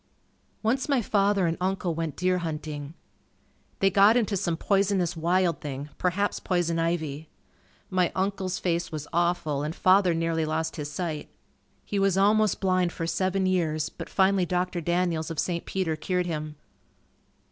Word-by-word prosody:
Once 255 +6 0
my 275 -3 +3
father 200 -3 +2
and 165 0 0
uncle 185 -2 0
went 165 -2 -3
deer 180 0 +1
hunting. 150 -2 -5 0.9
They 195 0 +4
got 200 +5 +6
into 215 -4 +1
some 175 -4 -1
poisonous 195 -2 +1
wild 170 0 +1
thing, 140 0 -5
perhaps 190 +3 0
poison 170 -2 0
ivy. 160 -3 -2 0.6
My 185 -2 +2
uncle's 190 -1 -1
face 170 -1 -1
was 150 -2 -5
awful 170 -4 +1
and 155 +3 -3
father 185 -2 +4
nearly 165 0 0
lost 160 +1 -2
his 150 -1 -4
sight. 155 -1 -4 0.6
He 205 - -2
was 195 -1 +2
almost 210 +1 +3
blind 185 -2 +1
for 165 - -4
seven 190 +2 0
years 160 -5 0
but - - -9
finally 190 -2 +2
Dr. 180 0 -1
Daniels 170 -1 0
of 165 - -5
St. 170 +2 -1
Peter 185 -5 -1
cured 180 +3 -1
him. 155 -3 -4
175 Hz, 155 wpm, -27 LUFS, 160-190 Hz, 0.9 s, got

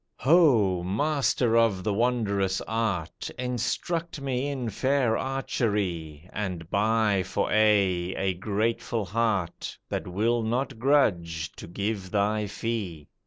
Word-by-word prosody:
"Ho! 125 - +4
Master 125 - +1
of 115 -5 +3
the 105 - 0
wondrous 100 -5 +1
art! 110 -8 -2
Instruct 155 +7 -2
me 135 -1 -1
in 130 -5 -3
fair 130 0 +1
archery, 100 - -2
And 90 -5 -4
buy 105 -1 +2
for 95 +2 -2
aye, 100 -4 +3
a 95 -1 0
grateful 110 +3 -1
heart 100 -3 -1
That - - -3
will 110 +6 +1
not 120 +2 -2
grudge 85 - +2
to - - -11
give 100 +1 -3
thy 105 +1 +1
fee." 100 -9 -4
110 Hz, 120 wpm, -27 LUFS, 95-120 Hz, -, Ho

